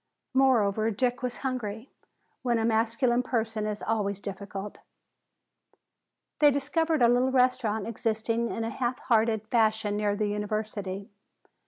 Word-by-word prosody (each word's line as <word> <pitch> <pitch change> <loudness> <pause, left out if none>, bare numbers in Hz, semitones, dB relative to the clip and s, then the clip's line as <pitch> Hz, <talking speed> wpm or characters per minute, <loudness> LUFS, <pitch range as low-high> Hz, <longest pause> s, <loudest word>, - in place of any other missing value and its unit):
Moreover, 225 -5 +3
Dick 245 +3 0
was 250 -1 -3
hungry, 230 -2 -3 0.5
when 240 -2 +1
a 225 - 0
masculine 230 +2 +2
person 225 -3 -2
is 210 -1 -4
always 205 -3 -1
difficult. 200 0 -7 1.6
They 295 - +7
discovered 295 +1 +1
a - - +7
little 245 +2 +3
restaurant 250 -5 +2
existing 230 +1 -1
in 225 - -3
a 225 - -2
half 250 -1 -2
hearted 220 -3 +1
fashion 220 -3 +2
near 205 -1 +1
the 210 +1 0
University. 205 -2 -3
225 Hz, 130 wpm, -28 LUFS, 210-250 Hz, 1.6 s, They